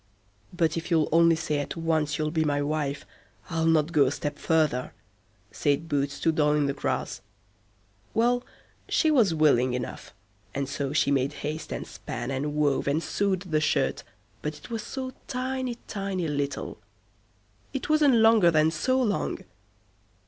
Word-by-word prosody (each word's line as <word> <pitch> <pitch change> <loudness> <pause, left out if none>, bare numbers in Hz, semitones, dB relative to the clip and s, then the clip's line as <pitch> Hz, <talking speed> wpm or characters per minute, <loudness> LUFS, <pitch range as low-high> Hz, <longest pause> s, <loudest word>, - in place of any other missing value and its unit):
"But 165 -2 0
if 165 - -4
you'll 160 -3 +2
only 165 +1 +5
say 155 -2 -1
at 145 - -4
once 155 -3 0
you'll 155 -1 -1
be 160 -1 +1
my 145 -2 +1
wife, 145 -1 -2 0.5
I'll 165 0 +1
not 160 0 +3
go 150 -4 +5
a - - 0
step 145 0 -4
further", 155 -6 +1 0.6
said 145 +2 0
Boots 140 -2 -1
to 165 - +3
Doll 150 -1 +2
i' 145 - +2
the 140 - 0
Grass. - - -3 0.9
Well, 245 +2 +2 0.5
she 315 - +3
was 220 - +4
willing 130 -5 +3
enough, 125 -1 -6 0.4
and 140 0 -1
so 140 0 -3
she 145 -1 +2
made 135 +1 +1
haste 155 +2 -4
and - - -4
span, 120 +3 -6
and 145 +2 -2
wove, 145 -2 +1
and 150 +4 +1
sewed 195 -3 0
the 160 -5 0
shirt, 155 - +1 0.4
but 150 0 -4
it 150 - -13
was 225 -1 -2
so 260 +1 -5
tiny, 255 -1 -3
tiny 195 -4 -2
little. 145 -1 -3 0.9
It 270 - -4
wasn't 300 -4 +4
longer 225 -5 +6
than 155 -1 +3
so————long. 245 +5 0
155 Hz, 160 wpm, -27 LUFS, 145-190 Hz, 0.9 s, longer